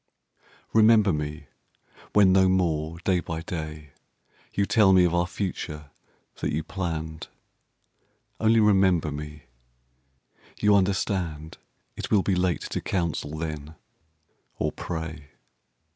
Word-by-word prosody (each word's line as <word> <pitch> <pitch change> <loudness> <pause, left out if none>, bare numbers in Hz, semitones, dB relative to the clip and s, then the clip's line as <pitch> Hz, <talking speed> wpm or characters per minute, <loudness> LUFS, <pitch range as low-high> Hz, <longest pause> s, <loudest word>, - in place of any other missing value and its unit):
Remember 110 -3 +5
me 75 0 -4 0.7
when 100 -3 +6
no 95 0 +5
more, 85 -3 0
day 90 -1 +2
by 80 -1 -5
day, 75 -4 -6 0.6
You 100 - 0
tell 100 -2 +4
me 90 -1 +6
of 85 -1 +2
our 90 0 +1
future 80 -5 -5 0.5
that - - -2
you 80 +2 -1
planned: 80 -4 -4 1.1
Only 115 +1 +4
remember 95 -6 +3
me; 75 +1 -7 1.2
you 105 0 +4
understand 95 -5 -1 0.4
It - - -5
will 100 -3 +3
be 95 - +1
late 90 -1 0
to - - -4
counsel 85 -4 -2
then 75 -1 -5 0.8
or - - -1
pray. 80 -3 -6
85 Hz, 115 wpm, -26 LUFS, 80-95 Hz, 1.2 s, when